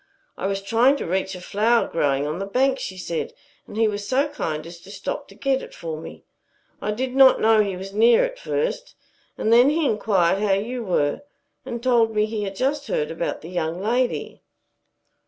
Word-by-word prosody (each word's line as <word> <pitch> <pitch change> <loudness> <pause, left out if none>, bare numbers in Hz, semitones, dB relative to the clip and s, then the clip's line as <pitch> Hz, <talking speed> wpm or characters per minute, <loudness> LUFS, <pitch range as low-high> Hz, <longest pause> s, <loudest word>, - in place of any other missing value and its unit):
"I - - -3
was 195 0 -2
trying 230 +7 +4
to - - -4
reach 190 +2 -1
a - - -8
flower 225 +6 +2
growing 140 -3 0
on 155 +4 -3
the 195 - -4
bank," 265 +5 +1
she 190 - -6
said, 170 -2 -4 0.3
"and - - -9
he 225 0 +4
was 205 -1 -3
so 275 +3 +1
kind 155 - -4
as 170 0 -10
to 190 - -15
stop 200 - -5
to - - -16
get 270 -1 0
it - - -11
for 165 -2 -5
me. - - -10 0.6
I - - -3
did 250 +4 -2
not 265 -1 +7
know 220 0 +5
he 200 -3 -2
was 195 +1 -8
near 230 +3 +5
at - - -7
first. - - -3 0.4
And 220 - +2
then 245 +4 +7
he 315 +1 +1
inquired 200 -5 +2
how 205 -2 +2
you 235 +5 -2
were 150 -7 0 0.5
and 235 0 -5
told 230 -3 +3
me 210 0 +3
he 215 -1 -4
had 195 0 -5
just 280 +5 -1
heard 150 - -1
about 165 +1 -3
the 165 - -9
young 170 -1 -2
lady." 240 +5 -1
215 Hz, 210 wpm, -23 LUFS, 185-255 Hz, 0.6 s, not